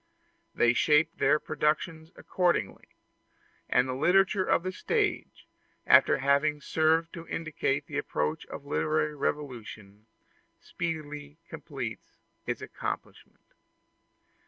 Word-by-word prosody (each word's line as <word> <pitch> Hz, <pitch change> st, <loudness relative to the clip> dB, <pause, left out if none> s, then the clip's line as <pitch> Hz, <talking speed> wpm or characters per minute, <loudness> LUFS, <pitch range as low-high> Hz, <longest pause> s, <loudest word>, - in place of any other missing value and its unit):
They 120 Hz, 0 st, +4 dB
shape 150 Hz, +5 st, +3 dB
their 150 Hz, -, +4 dB
productions 155 Hz, +2 st, -1 dB
accordingly; 175 Hz, -, -1 dB, 0.8 s
and 125 Hz, +1 st, +3 dB
the 130 Hz, -, -2 dB
literature 190 Hz, +7 st, +3 dB
of 170 Hz, -, +1 dB
the 185 Hz, -, -2 dB
stage, -, -, -2 dB, 0.4 s
after -, -, +6 dB
having 140 Hz, +2 st, +2 dB
served 160 Hz, +3 st, +1 dB
to 170 Hz, -2 st, -9 dB
indicate 150 Hz, -3 st, -2 dB
the 145 Hz, 0 st, -3 dB
approaching 75 Hz, -, -2 dB
literary 155 Hz, -, 0 dB
revolution, 110 Hz, -8 st, -5 dB, 0.5 s
speedily 150 Hz, -3 st, -5 dB
completes 125 Hz, -7 st, -7 dB, 0.3 s
its -, -, -3 dB
accomplishment. -, -, -7 dB
150 Hz, 100 wpm, -29 LUFS, 130-160 Hz, 0.8 s, after